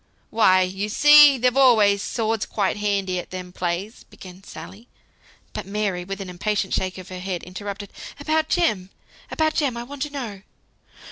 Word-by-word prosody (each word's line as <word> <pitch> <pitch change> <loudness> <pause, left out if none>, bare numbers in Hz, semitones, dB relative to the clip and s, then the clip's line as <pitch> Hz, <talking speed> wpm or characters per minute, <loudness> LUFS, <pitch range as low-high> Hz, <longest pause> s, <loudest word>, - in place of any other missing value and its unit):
"Why, 185 -4 +4
you 195 +3 -3
see, 295 +3 +7
they've 250 +1 +1
always 220 -7 +5
swords 225 -1 -2
quite 200 -2 -1
handy 200 -3 -1
at - - -8
them 180 -1 -7
plays," 180 +5 -4
began 185 0 -14
Sally; 215 +3 -11 0.7
but 210 -3 -6
Mary, 200 -3 -2
with 195 +2 -6
an 195 - -6
impatient 190 +2 -2
shake 185 0 -2
of 185 0 -10
her 185 -1 -7
head, 180 -1 -4
interrupted, 200 +2 -7 0.3
"About 315 +2 0
Jem, 215 - 0 0.4
about 315 0 0
Jem, 280 -7 -1
I 235 - -5
want 275 +2 -10
to 295 - -1
know." 235 -9 -6
205 Hz, 165 wpm, -23 LUFS, 185-245 Hz, 0.7 s, see